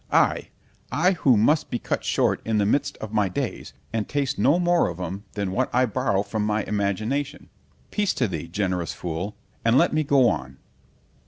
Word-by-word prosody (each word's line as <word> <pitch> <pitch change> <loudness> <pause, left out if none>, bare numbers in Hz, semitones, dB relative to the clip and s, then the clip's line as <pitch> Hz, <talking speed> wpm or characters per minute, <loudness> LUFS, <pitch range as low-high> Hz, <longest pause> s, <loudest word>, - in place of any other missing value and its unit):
I——I 165 +8 0
who 135 - +3
must 145 +9 +3
be 120 - -1
cut - - -3
short - - +1
in 110 -1 0
the 105 - +2
midst 145 +6 0
of 110 0 -7
my 105 -3 +2
days, 90 - -4 0.2
and 110 -2 -2
taste 140 -3 -1
no 145 +6 +4
more 175 -1 +3
of 90 0 -7
'em 95 +3 -5
than 100 -2 -2
what 95 - 0
I 125 +1 +3
borrow 110 -4 0
from 105 +1 -2
my 105 0 0
imagination——peace 130 - -3
to 125 - +1
thee, 85 -3 -5
generous 90 -2 -2
fool! 90 +5 -4 0.3
and 115 +2 +4
let - - +4
me 155 0 +2
go 140 -3 +4
on. 65 - -2
110 Hz, 180 wpm, -24 LUFS, 100-140 Hz, 0.3 s, no